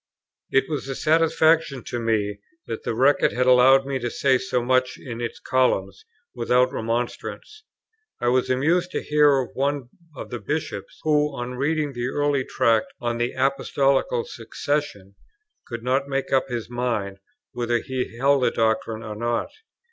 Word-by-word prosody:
It 135 0 +2
was 150 -4 -4
a 135 - -4
satisfaction 160 -2 +2
to 120 - -4
me 105 -3 -1 0.3
that 115 - -5
the - - -3
Record 135 +5 +3
had 125 +1 +1
allowed 130 +2 +6
me 135 -1 -2
to 120 0 -2
say 130 +1 +2
so 125 -2 -1
much 130 0 +1
in 120 -2 -7
its 120 - -4
columns, 100 -7 0 0.3
without 125 +2 +2
remonstrance. 120 - -4 0.5
I 120 - +1
was 130 +1 +1
amused 165 +8 +2
to - - -2
hear 150 -2 +4
of 125 - -4
one 140 -2 -1 0.3
of - - -8
the 120 - -4
Bishops, 150 +9 -4
who, 150 -2 +2
on 120 +1 -4
reading 150 +3 0
an 120 +1 -2
early 145 -2 +1
Tract 115 -3 +2
on 120 -1 -2
the 120 +1 -1
Apostolical 140 - +1
Succession, 145 - -4 0.5
could 115 -1 -6
not 130 +2 +1
make 135 -1 -2
up 135 - +3
his 120 -2 -4
mind 115 -5 -2 0.3
whether 120 -1 0
he 125 -1 -4
held 140 +2 +3
the - - +3
doctrine 110 0 -1
or 105 -1 -6
not. 120 +2 -2
130 Hz, 165 wpm, -24 LUFS, 120-140 Hz, 0.5 s, allowed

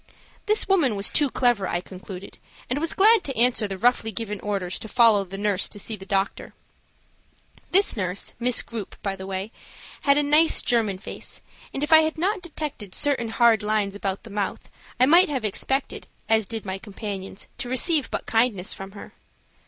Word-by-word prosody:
This 425 +1 +3
woman 330 - +3
was 200 0 0
too 290 -2 +2
clever, 240 -7 +1
I 175 - -1
concluded, 185 +1 -10 0.3
and 270 - +1
was 325 +1 0
glad 435 +1 +5
to 270 - -4
answer 235 -2 +3
the 195 -1 -5
roughly 235 +1 +2
given 210 -1 -4
orders 195 -3 -3
to - - -8
follow 220 -3 +4
the 195 +1 -8
nurse 205 -1 +1
to - - -8
see 220 +2 -5
the 190 -1 -12
doctor. 195 -1 -2 1.1
This 390 +2 +4
nurse, 185 -2 -3
Miss 245 0 +1
Grupe, 225 -4 -7
by 195 -1 -2
the 190 0 -8
way, 195 +2 -4 0.5
had 280 0 +3
a 295 - +3
nice 305 +3 +4
German 220 -5 +1
face, 185 - -8 0.3
and 275 - -4
if 300 - +2
I 315 - +10
had 315 0 0
not 385 +4 0
detected 300 - -6
certain 270 -6 +1
hard 225 -1 +4
lines 210 -2 0
about 195 -1 -4
the 225 - -11
mouth 200 -1 -4 0.3
I 255 - +6
might 340 +6 +6
have 265 -6 -2
expected, 265 +6 -1 0.2
as 220 -2 +2
did 225 -2 -4
my 190 0 -4
companions, 195 -2 -6
to 245 - -4
receive 295 +3 +2
but - - -4
kindness 225 -5 +1
from 195 0 -9
her. 205 - -11
220 Hz, 190 wpm, -24 LUFS, 195-275 Hz, 1.1 s, I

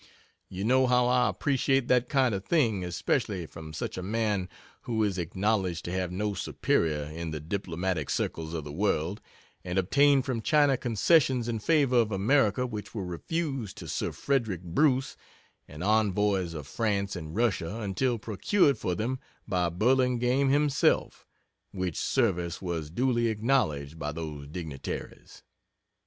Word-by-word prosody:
You 95 +1 -5
know 130 +3 +4
how 125 0 +4
I 125 0 +3
appreciate 135 -2 +1
that 125 -1 +2
kind 130 -5 +2
of 95 -1 -3
thing 115 - +1
especially 90 +1 -1
from 80 0 -10
such 80 - -4
a - - -4
man, 105 -1 -1 0.4
who 110 -2 0
is 100 -3 0
acknowledged 95 -1 -1
to 85 - -4
have 90 -1 -2
no 105 +3 -1
superior 80 -4 0
in 80 +3 -6
the 80 -1 -4
diplomatic 85 -1 -3
circles 80 0 -2
of 80 - -3
the 75 - -7
world, 90 +1 -1 0.4
and 90 0 -3
obtained 140 +8 +4
from 125 -5 -2
China 145 +1 +4
concessions 125 +1 +2
in 115 -2 -2
favor 140 0 +3
of 115 -2 +3
America 110 +3 +2
which 110 -2 -6
were 100 -4 -3
refused 135 - -3
to - - -8
Sir - - -2
Frederick 115 -11 -1
Bruce 130 - +1 0.5
and 75 +3 -8
Envoys 100 -4 +1
of 75 -3 -6
France 100 - -1
and 80 -1 -7
Russia 105 -3 0
until 115 +5 0
procured 135 - +1
for 90 - -1
them 125 +7 -2 0.3
by 90 -2 +1
Burlingame 125 +6 +2
himself 145 0 +1 0.4
which 95 -3 -3
service 90 -9 0
was 85 -5 -4
duly 120 +5 +1
acknowledged 105 - 0
by 75 0 -3
those 75 -3 -6
dignitaries. 75 -3 -7
105 Hz, 150 wpm, -28 LUFS, 85-125 Hz, 0.5 s, know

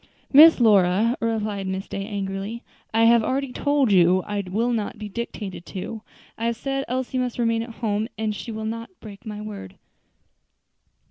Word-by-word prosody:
"Miss 315 +3 +9
Lora," 210 +1 +4
replied 215 -4 -2
Miss 190 +1 -4
Day, 195 0 -5
angrily, 200 +2 -4 0.3
"I 225 +1 +3
have 230 0 +6
already 270 +2 -1
told 285 -5 +1
you 185 0 +4
I 205 -1 -2
was 230 +6 0
not 215 -2 -2
to - - -20
be 210 0 -7
dictated 205 -4 -6
to. 210 +4 -6 0.4
I 230 - -2
have 235 - 0
said 270 +3 -3
Elsie 255 +1 -2
must 250 -1 -2
remain 230 -1 +1
at 230 - -6 0.2
home, 210 +1 0
and 215 0 -1
I - - -8
shall 220 0 -6
not 230 +1 -4
break 210 +1 -11
my 210 -1 -6
word." 205 - -8
220 Hz, 180 wpm, -24 LUFS, 200-235 Hz, 0.4 s, Miss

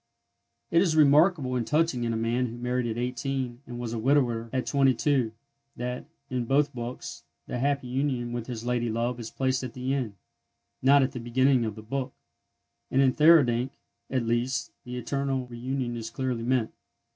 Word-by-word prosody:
It 170 - +5
is 170 -4 +2
remarkable 150 -2 +4
and 120 -3 -1
touching 150 -6 +1
in 115 - 0
a 115 - -1
man 120 +3 0
who 115 +1 -7
married 125 0 -1
at 115 0 -3
eighteen, 125 0 -3
and 120 0 -6
was 120 -1 -4
a 115 - -2
widower 120 -3 +2
at 130 -1 -1
twenty 135 -2 +3
two, 130 -4 +1 0.4
that, 125 +3 -4 0.2
in 125 -2 -2
both 140 +4 +2
books, 120 0 -6 0.2
the 125 - -4
happy 140 0 0
union 125 -2 -1
with 120 -1 -4
his 120 -2 -5
lady 120 -1 0
love 120 +2 -1
is 115 -1 -6
placed 130 -1 0
at 125 -3 -5
the 130 +1 -2
end—not 130 +3 -1
at 130 - 0
the 130 - -6
beginning 125 +1 +2
of 110 -2 -3
the 110 - -10
book; 130 +3 -3 0.8
and 130 - +1
in 135 -2 +5
Theurdank, 135 -5 +5 0.4
at 130 -3 0
least, 120 +2 0
the 125 0 -5
eternal 135 +1 -1
reunion 125 0 -3
is 115 -1 -5
clearly 125 -1 -2
meant. 125 -3 +1
125 Hz, 180 wpm, -27 LUFS, 120-135 Hz, 0.8 s, It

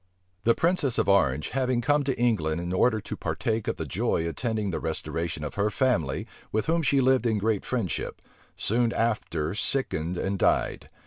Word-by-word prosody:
The 115 - +5
princess 165 -7 +1
of - - +1
Orange, 75 -8 +3
having 130 -2 0
come 145 +4 +2
to 135 -3 -1
England 85 -10 +1
in 85 +1 -3
order 110 +4 +3
to - - -6
partake 110 +1 -2
of 115 - 0
the 80 - -3
joy 80 +4 0
attending 110 +2 -2
the - - -2
restoration 80 -2 -3
of 75 - -4
her 100 +1 +1
family, 105 - 0 0.3
with 110 - 0
whom 165 +1 +2
she 140 -2 +3
lived 130 -1 +3
in 110 -2 +1
great 105 0 0
friendship, 115 -9 -2 0.4
soon 115 +1 +1
after 90 -8 -1
sickened 90 - -1
and 95 +2 -2
died. - - +1
110 Hz, 180 wpm, -27 LUFS, 85-125 Hz, 0.4 s, The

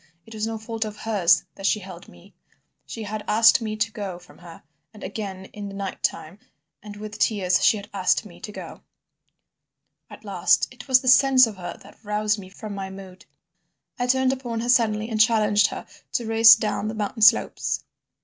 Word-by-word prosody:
It 225 - -13
was 215 0 -3
no 225 0 -4
fault 225 +1 -4
of 215 -1 -7
hers 205 -7 +2
that 195 - -3
she 215 - +1
held 185 -3 -11
me. 85 0 -18 0.5
She 225 - -7
had 210 0 -5
asked 225 +2 +5
me 215 -1 -4
to 215 +1 -1
go 200 -4 -6
from 180 - -18
her, 170 -1 -13 0.3
and 210 - -12
again 195 -2 -6
in 205 -1 -7
the 195 - -9
night 195 -1 -6
time 170 +6 -3 0.4
and 210 0 -10
with 215 +1 -9
tears 185 -4 +1
she 220 - +4
had 205 0 -9
asked 195 +3 +1
me 175 -4 -14
to 210 - -8
go. - - -10 1.3
"At - - -14
last - - +2
it - - -13
was 260 -1 +5
the 260 - -7
sense 260 0 +6
of 215 -3 -8
her 175 -1 -7
that - - -18
roused 210 0 -1
me 185 -2 -11
from 210 +2 -9
my 195 -1 -6
mood. 190 -1 -12 0.7
I 245 - -1
turned 260 +1 +2
upon 240 -4 -5
her 240 - -4
suddenly 220 -3 +2
and 220 -2 0
challenged 215 -2 +3
her - - -8 0.3
to 235 - -1
race 225 +1 +7
down 215 -1 -3
the 220 - -4
mountain 215 +1 -4
slopes. 215 - +3
215 Hz, 200 wpm, -23 LUFS, 195-225 Hz, 1.3 s, race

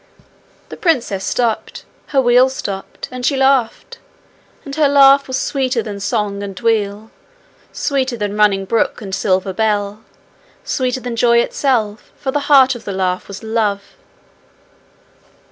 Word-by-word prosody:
The - - -9
princess 245 - 0
stopped, 230 0 -2 0.2
her 275 - +1
wheel 250 0 +4
stopped, 200 -7 -6
and 250 0 -7
she 275 +2 +1
laughed. 265 -4 +1 0.7
And 280 -1 -7
her 305 -2 +3
laugh 275 0 +6
was 260 - -2
sweeter 255 -4 -1
than 205 -2 -6
song 200 0 -2
and 195 -2 -7
wheel; 220 -2 -1 0.6
sweeter 265 -3 -1
than 205 -1 -3
running 200 -2 +2
brook 230 +4 0
and 195 -3 -8
silver 190 0 0
bell; 210 0 -1 0.6
sweeter 255 -1 -2
than 245 -1 -5
joy 235 0 +3
itself, 235 -4 0
for 265 - -3
the 290 - 0
heart 265 -2 +6
of 240 - -9
the 200 - -5
laugh 185 -1 -2
was 200 +2 -9
love. 215 -3 -1
230 Hz, 145 wpm, -17 LUFS, 205-260 Hz, 0.7 s, laugh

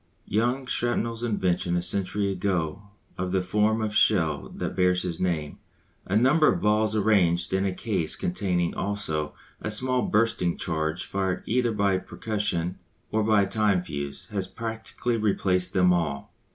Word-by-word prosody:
Young 120 +5 0
Shrapnell's 120 -2 -1
invention 90 -6 0
a - - 0
century 100 +2 0
ago 95 0 -2 0.3
of 90 0 -2
the 95 -1 +1
form 105 +4 +1
of 105 -1 -2
shell 95 -6 +2
that - - -5
bears 90 -1 +2
his 85 -3 -3
name, 80 -5 -2 0.5
a 100 - 0
number 135 +8 +5
of 90 - -1
balls 105 +2 +2
arranged 95 -5 +2
in 95 +1 +1
a - - 0
case 95 -4 -2
containing 90 -1 -1
also 80 -7 -2 0.3
a - - -3
small 125 +4 +2
bursting 105 -7 +1
charge 80 0 -2
fired 95 -2 -2
either 120 +1 +1
by 100 -3 +1
percussion 95 -5 -2 0.3
or 110 - +1
by 105 -1 +4
a - - -1
time 100 -2 +1
fuse, 70 -4 -6
has 95 -3 -2
practically 115 +2 -3
replaced 95 -4 +1
them 90 -1 +4
all. 75 -5 -2
100 Hz, 155 wpm, -26 LUFS, 90-110 Hz, 0.5 s, number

